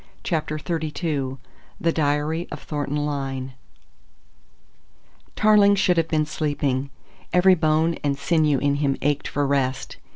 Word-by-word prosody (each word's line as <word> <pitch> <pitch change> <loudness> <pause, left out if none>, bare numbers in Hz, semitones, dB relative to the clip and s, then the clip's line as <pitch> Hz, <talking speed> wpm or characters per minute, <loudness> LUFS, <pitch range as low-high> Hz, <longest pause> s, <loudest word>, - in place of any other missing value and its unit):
CHAPTER 155 -3 -2
XXXII 155 -4 -3 0.4
THE 165 - +1
DIARY 155 +2 0
OF 150 - -6
THORNTON 145 0 -2
LYNE 135 -3 -4 1.8
Tarling 210 -1 +5
should 185 -2 +2
have 165 -1 +2
been 155 -1 +1
sleeping. 145 -3 -2 0.4
Every 185 +1 +5
bone 160 0 +2
and 140 -1 0
sinew 155 -1 +2
in 140 +2 +1
him 140 -2 0
ached 145 0 0
for 145 0 -1
rest. 135 -1 -1
150 Hz, 125 wpm, -23 LUFS, 140-165 Hz, 1.8 s, Tarling